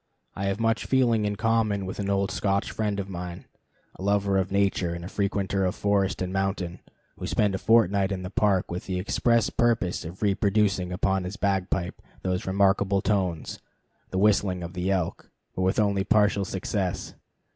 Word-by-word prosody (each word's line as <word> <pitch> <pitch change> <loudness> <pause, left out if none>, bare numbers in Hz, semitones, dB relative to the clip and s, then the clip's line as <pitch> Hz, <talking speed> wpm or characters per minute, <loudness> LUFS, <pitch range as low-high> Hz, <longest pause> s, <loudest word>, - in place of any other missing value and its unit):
I 100 - -3
have 100 +2 -1
much 115 0 +1
feeling 120 -5 +3
in 105 0 -1
common 110 -3 +1
with 95 - -6
an 100 -1 -2
old 100 0 +1
Scotch 100 0 0
friend 105 -2 -1
of 95 - -3
mine, 90 -2 -6 0.5
a - - -13
lover 100 0 +2
of 95 0 -2
nature 95 -3 +1
and 85 0 -7
a - - -5
frequenter 100 -1 -1
of 90 - 0
forest 100 -3 +1
and 90 0 -4
mountain, 95 -2 -2 0.4
who - - -4
spent 105 -2 +1
a 95 - -2
fortnight 100 -3 +3
in 95 -1 -3
the 90 - -6
Park 100 -4 +1
with 90 - -5
the 95 -1 -2
express 115 +4 +1
purpose 115 -8 +1
of 85 +5 -7
reproducing 100 -3 +1
upon 95 +1 0
his 90 +3 -6
bagpipe 95 -3 -1 0.2
those 90 0 -2
remarkable 100 0 +2
notes, 95 -6 -1 0.5
the 95 - -3
whistling 100 -3 +2
of 85 +1 -7
the 90 +1 -2
elk, 95 -4 -2 0.3
but - - -2
with 95 +2 +1
only 100 -2 +2
partial 105 -1 +3
success. 95 -1 -3
95 Hz, 180 wpm, -26 LUFS, 95-105 Hz, 0.5 s, feeling